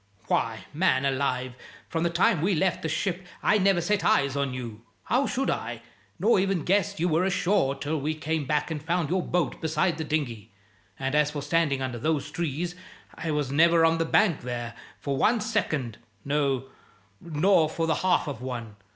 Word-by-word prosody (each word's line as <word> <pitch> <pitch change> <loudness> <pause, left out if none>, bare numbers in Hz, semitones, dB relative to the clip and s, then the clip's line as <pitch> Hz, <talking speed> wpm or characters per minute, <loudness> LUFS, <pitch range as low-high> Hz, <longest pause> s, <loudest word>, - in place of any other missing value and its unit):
Why, 110 -4 -1
man 145 -4 +2
alive, 130 -2 -1 0.3
from 165 - -2
the 170 - +2
time 175 +1 +2
we 190 +3 +2
left 185 +2 +1
the 160 - -2
ship 180 +3 -2 0.2
I 210 - +4
never 195 -2 +3
set 205 +4 0
eyes 140 -1 +3
on 140 -1 0
you 120 -4 -6 0.2
(how 260 +3 +1
should 270 +2 0
I?), 115 -1 -4 0.3
nor 205 +3 +3
ever 195 +1 +1
guessed 195 +3 0
you 175 - +2
were 165 +1 +2
ashore 185 -6 +1
till 150 +2 -3
we 155 +3 -1
came 155 -1 -2
back 150 +2 0
and 150 -2 -3
found 165 0 -1
your 185 0 +2
boat 175 -3 -1
beside 160 +2 0
the - - -1
dinghy. 125 -9 -3 0.5
And 135 0 -2
as 150 -1 +3
for 145 -1 -5
standing 145 -3 +1
under 125 -2 -4
those 145 +1 -1
trees, 170 +1 -2 0.4
I 165 - -5
was 150 -3 -1
never 165 +2 +5
on 165 0 +2
the 165 - +1
bank 175 -2 +3
there 120 -1 -4 0.3
for 140 -1 -2
one 230 - +3
second 155 - -2 0.3
no, 140 -2 +1 0.6
nor 165 0 +3
for 165 +1 -1
the 160 -1 +1
half 185 -4 +2
of 135 -5 -5
one. 120 -5 -6
155 Hz, 190 wpm, -26 LUFS, 135-175 Hz, 0.6 s, never